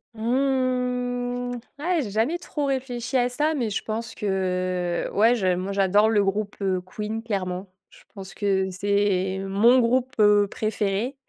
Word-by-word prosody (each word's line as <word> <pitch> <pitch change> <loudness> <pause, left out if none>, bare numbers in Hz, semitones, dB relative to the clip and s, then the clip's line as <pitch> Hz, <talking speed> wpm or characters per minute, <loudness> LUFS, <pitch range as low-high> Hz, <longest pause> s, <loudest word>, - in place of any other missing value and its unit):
Mmh, 245 0 -1 0.2
eh 340 +2 +1
j'ai 235 - -4
jamais 235 - 0
trop 295 -4 -3
réfléchi 255 -2 -3
à 245 0 +2
ça, 300 +5 0
mais 245 -7 -1
je 205 - -3
pense 225 +1 -4
que 185 -3 -1
ouais, 225 +4 +4
je 190 -5 +1
moi 185 +2 -3
j'adore 200 +2 +3
le 210 -2 +3
groupe, 200 +1 -2
heu, 185 -2 0
Queen 215 +4 -5
clairement. 190 -4 -4 0.2
Je - - -18
pense 195 -1 -9
que 190 -2 0
c'est 190 -1 0
mon 225 +6 +5
groupe, 250 +2 +1
heu, 205 -1 +5
préféré 215 +4 -2
215 Hz, 155 wpm, -24 LUFS, 195-245 Hz, 0.2 s, mon